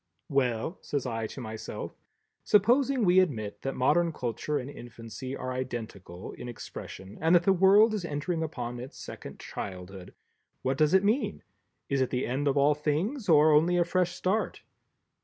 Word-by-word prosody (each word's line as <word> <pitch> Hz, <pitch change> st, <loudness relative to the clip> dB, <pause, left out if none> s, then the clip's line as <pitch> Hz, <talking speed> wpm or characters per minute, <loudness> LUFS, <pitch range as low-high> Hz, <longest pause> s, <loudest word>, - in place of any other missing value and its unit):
"Well," 135 Hz, -, 0 dB
says 145 Hz, -3 st, -3 dB
I 115 Hz, -2 st, -2 dB
to 130 Hz, -, -8 dB
myself, 110 Hz, -2 st, -6 dB, 0.5 s
"supposing 245 Hz, +4 st, +3 dB
we 180 Hz, +1 st, +6 dB
admit 115 Hz, -, -1 dB
that 135 Hz, -, -3 dB
Modern 165 Hz, +6 st, +3 dB
Culture 125 Hz, +2 st, -2 dB
and 130 Hz, -2 st, -4 dB
Infancy 120 Hz, 0 st, -8 dB
are 130 Hz, -, -4 dB
identical 110 Hz, -8 st, -6 dB
in 125 Hz, -, -8 dB
expression, 100 Hz, -4 st, -9 dB
and 165 Hz, +2 st, +5 dB
that 175 Hz, -, +5 dB
the 195 Hz, -, +4 dB
World 200 Hz, +4 st, +6 dB
is 210 Hz, -4 st, -2 dB
entering 160 Hz, +2 st, -2 dB
upon 125 Hz, -6 st, -4 dB
its 125 Hz, +2 st, -9 dB
second -, -, -9 dB
childhood; 95 Hz, -1 st, -7 dB, 0.5 s
what 130 Hz, +1 st, 0 dB
does 155 Hz, +3 st, +4 dB
it 190 Hz, -, +5 dB
mean⸺ 220 Hz, +7 st, +1 dB, 0.5 s
Is 140 Hz, -1 st, 0 dB
it 130 Hz, -, +1 dB
the 125 Hz, 0 st, -1 dB
end 135 Hz, +4 st, -1 dB
of 140 Hz, 0 st, +2 dB
all 140 Hz, +2 st, +5 dB
things 165 Hz, -, -1 dB
or 155 Hz, -1 st, +6 dB
only 165 Hz, +4 st, +4 dB
a 175 Hz, -, +3 dB
fresh 180 Hz, 0 st, 0 dB
start?" 200 Hz, +4 st, -1 dB
145 Hz, 170 wpm, -29 LUFS, 120-175 Hz, 0.5 s, we